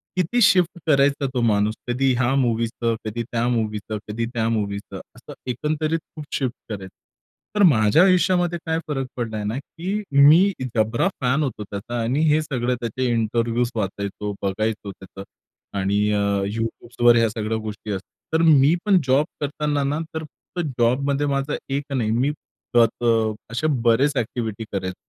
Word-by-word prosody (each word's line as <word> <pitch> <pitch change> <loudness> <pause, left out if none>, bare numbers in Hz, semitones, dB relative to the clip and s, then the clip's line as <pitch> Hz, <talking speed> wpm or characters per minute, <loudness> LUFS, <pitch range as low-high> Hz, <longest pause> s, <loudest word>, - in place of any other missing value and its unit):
किती 185 +7 +1
शिफ्ट 180 -4 +4
करायचा 140 -1 +3
तो 125 - 0
माणूस? 105 -2 +2
कधी 130 +2 +2
ह्या 125 +1 +2
मूवीचं, 115 -2 0
कधी 115 +2 -3
त्या 115 0 -1
मूवीचं, 110 -2 -2
कधी 110 +2 -2
त्या 115 -2 0
मूवीचं, 100 -3 -3 0.2
असं - - -11 0.2
एकंदरीत 155 +5 -1 0.2
खूप 155 -2 -7
शिफ्ट 130 -3 -1 0.2
करायचं. 95 -3 -7 0.6
तर 205 - +4
माझ्या 135 - +5
आयुष्यामध्ये 180 -1 +3
काय 160 0 0
फरक 135 -3 -2
पडलाय 110 -3 -3
ना, 105 +4 -2
की 185 +9 -4
मी 155 +8 +6 0.2
जबरा 110 - +2
फॅन 130 +4 +2
होतो 125 -6 -3
त्याचा 115 +4 -5
आणि 130 +6 0
हे 155 +1 +3
सगळं 125 -4 -1
त्याचे 120 +2 -2
इंटरव्ह्यूज 115 +1 0
वाचायचो, 100 0 -3
बघायचो 105 +1 -2
त्याचं 95 0 -11 0.5
आणि 100 +2 +1
अ, 105 - +1 0.4
YouTubeवर 120 +1 +2
ह्या 115 -1 +3
सगळ्या 110 0 -2
गोष्टी 110 0 -6
असतात. 95 +9 -9
तर - - +1
मी 145 +1 +6
पण 200 -3 +5
जॉब 135 +3 +4 0.2
करताना 145 0 -1
ना, 145 +3 -1 0.2
तर 160 - -3
फक्त 170 +3 -7
जॉबमध्ये 140 +4 +2
माझा 140 +1 -1
एक 140 +1 -1
नाही, 115 -5 0
मी 125 +6 +1 0.4
त 120 -1 +7 0.2
त - - -1 0.5
असे 125 +7 -1
बरेच 125 +5 +3
एक्टिव्हिटी 115 -2 -3
करायचो. 95 -2 -3
120 Hz, 160 wpm, -22 LUFS, 110-145 Hz, 0.6 s, त